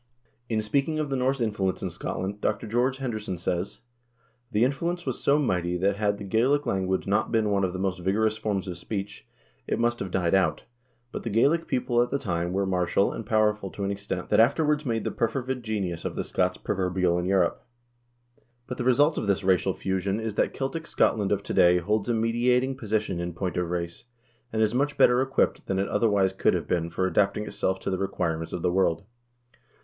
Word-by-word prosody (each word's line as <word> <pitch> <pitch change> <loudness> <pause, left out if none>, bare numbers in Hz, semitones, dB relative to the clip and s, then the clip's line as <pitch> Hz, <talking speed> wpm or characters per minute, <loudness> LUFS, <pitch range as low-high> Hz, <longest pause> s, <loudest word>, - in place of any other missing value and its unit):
In 110 -2 +1
speaking 140 +8 0
of 150 -2 -2
the - - +1
Norse 130 +1 +1
influence 105 -5 -1
in - - -2
Scotland 100 +3 -4
Dr. - - -1
George 120 +4 +1
Henderson 110 -8 -4
says: 90 +2 -3 0.3
" 120 +1 -40
The 105 +1 +2
influence 170 +7 -1
was 130 -3 -3
so 140 - +4
mighty 90 - 0
that 95 +2 +1
had 105 -1 +1
the 100 - -8
Gaelic 125 +9 +2
language 95 -1 0
not 100 +2 +1
been 110 -2 +2
one 100 -1 +2
of 95 - +1
the 95 - -5
most 95 -1 -1
vigorous 105 +4 +1
forms 105 -3 -2
of 90 -2 -5
speech, 100 - -5 0.4
it - - 0
must 120 0 +1
have 95 - -4
died 90 -1 0
out; 90 -5 +2 0.5
but - - -5
the 115 - -4
Gaelic 145 +10 +2
people 120 -1 +1
at 120 - +1
the 140 - 0
time 85 -9 -2
were 100 +1 0
martial 95 +1 +1
and 110 - -7
power 110 -2 +3
ful 100 -2 -8
to 100 - -6
an 100 - 0
extent 100 -2 -4
that - - +4
afterwards 150 +5 +3
made 115 -2 0
the - - -2
perfervid 130 +2 -2
genius 100 -7 -3
of - - -4
the - - -2
Scots 90 0 0
proverbial 90 -2 0
in 90 - -2
Europe. 95 -2 +1 1.0
But 125 - -6
the - - 0
result 145 +5 +3
of 105 - -3
this 100 0 +1
racial 95 0 +2
fusion 95 +2 -1
is 110 -1 -3
that - - +1
Celtic 160 +5 -3
Scotland 105 -3 +1
of 100 -1 0
to - - -4
day 90 0 +5
holds 105 +5 0
a 120 - +2
mediating 125 +3 +1
position 110 -6 -2
in 85 0 -3
point 90 +1 -3
of 90 -1 -1
race, 85 +3 -4 0.5
and 110 0 +1
is 110 - +1
much 140 +3 0
better 125 +1 +5
equipped 135 0 0
than 95 - 0
it 100 +1 0
otherwise 100 -3 +2
could - - +2
have - - -3
been 85 -1 0
for 95 +2 -1
adapting 100 +3 +1
itself 95 -2 -1
to - - -2
the 95 - -1
requirements 85 -4 -2
of 90 - -4
the 90 - +2
world. 90 -2 +1
100 Hz, 215 wpm, -26 LUFS, 95-120 Hz, 1.0 s, day